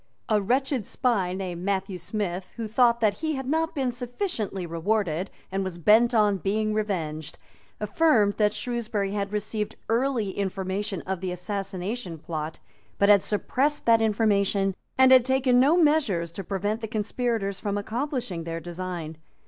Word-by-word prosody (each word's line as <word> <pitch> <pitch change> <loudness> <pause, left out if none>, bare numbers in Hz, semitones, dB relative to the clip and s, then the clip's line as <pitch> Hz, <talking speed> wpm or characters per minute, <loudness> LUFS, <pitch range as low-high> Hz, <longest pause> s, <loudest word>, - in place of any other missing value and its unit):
A 215 -2 +3
wretched 255 +1 0
spy 200 -8 0
named 180 -3 -4
Matthew 195 -1 -1
Smith, 185 0 -4
who 230 -2 -4
thought 235 +1 +3
that 210 -2 +2
he 315 -1 -1
had 265 -1 -4
not 320 +3 0
been 265 -3 0
sufficiently 245 - -3
rewarded, 175 +1 -1 0.2
and 195 +1 -1
was 185 -2 -4
bent 225 +7 +5
on 210 -2 +4
being 215 +4 0
revenged, 165 -8 -3 0.4
affirmed 210 -2 +3
that 210 -1 +3
Shrewsbury 220 -4 -2
had 200 -1 -2
received 210 0 -3
early 235 -3 +1
information 195 0 -2
of 190 -1 -3
the 185 -1 -2
Assassination 190 +1 -4
Plot, 155 -1 -5 0.4
but 200 - +3
had 200 -2 +6
suppressed 270 +7 0
that 230 -1 +5
information, 200 -3 +2 0.2
and 260 0 +6
had 260 -2 +8
taken 260 -1 +3
no 290 +7 +5
measures 275 - +2
to 195 +3 -6
prevent 205 +4 -2
the 220 - -3
conspirators 220 -2 -2
from 205 -1 -2
accomplishing 230 - -3
their 165 0 -4
design. 175 -2 -6
210 Hz, 155 wpm, -26 LUFS, 190-240 Hz, 0.4 s, had